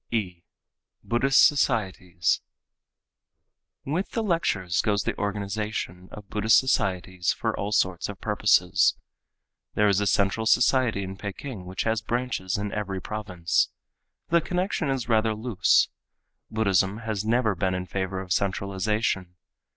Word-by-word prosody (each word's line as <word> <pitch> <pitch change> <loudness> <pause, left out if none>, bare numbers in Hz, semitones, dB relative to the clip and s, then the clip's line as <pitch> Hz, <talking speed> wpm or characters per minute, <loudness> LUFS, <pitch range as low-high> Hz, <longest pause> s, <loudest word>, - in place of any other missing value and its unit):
(e) 95 -7 -2 0.6
Buddhist 135 +4 +4
Societies.—With 115 - -3
the 225 - -1
lectures 100 - 0
goes 105 -2 0
the - - -2
organization 100 -2 -3
of 105 -1 -10
Buddhist 105 +2 +3
societies 95 -7 0
for - - -2
all 100 +1 -3
sorts 95 -3 +1
of 100 - -7
purposes. 105 -4 +3 0.8
There 105 - +4
is 100 0 +3
a 105 - +1
central 100 +3 +1
society 120 -3 +3
in 95 0 -7
Peking 105 0 -7
which 95 0 -3
has 110 -1 0
branches 115 -5 -2
in 100 0 -3
every 100 -3 -3
province. 95 -5 -1 0.6
The 170 0 +4
connection 180 -2 -1
is 135 -4 -2
rather 110 -1 +2
loose. 110 -4 +2 0.6
Buddhism 100 -2 +1
has 105 -2 -2
never 115 0 +2
been 95 +1 -1
in 90 0 -3
favor 95 0 -3
of 90 -2 -2
centralization. 100 -1 -1
105 Hz, 130 wpm, -26 LUFS, 95-115 Hz, 0.8 s, Buddhist